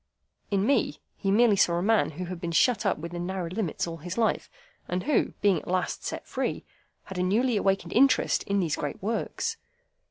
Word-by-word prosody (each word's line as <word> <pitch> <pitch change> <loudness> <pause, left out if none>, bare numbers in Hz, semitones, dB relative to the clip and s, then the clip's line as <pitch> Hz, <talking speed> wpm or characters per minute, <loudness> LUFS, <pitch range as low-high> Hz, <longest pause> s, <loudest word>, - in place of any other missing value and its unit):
In 200 -1 +1
me, 280 - +2 0.2
he 195 - -2
merely 215 +1 +5
saw 175 -3 +3
a 175 - 0
man 220 +1 +3
who 180 +5 -5
had 175 -1 -6
been 170 - -3
shut 215 +4 +3
up - - +1
within 175 +2 -5
narrow 185 -3 -3
limits 185 -4 -2
all 165 -1 -6
his 175 +5 -6
life, 225 -2 +1 0.4
and 180 +1 -2
who, 295 +2 +1
being 195 -5 +4
at - - -15
last 185 0 -1
set - - -4
free, - - -3 0.4
had 190 -2 -7
a - - +2
newly 225 +7 +2
awakened 195 -1 0
interest 270 +3 +4
in 200 -1 +1
these 165 -5 0
great 145 +4 -4
works. 340 - -2
190 Hz, 200 wpm, -27 LUFS, 175-220 Hz, 0.4 s, merely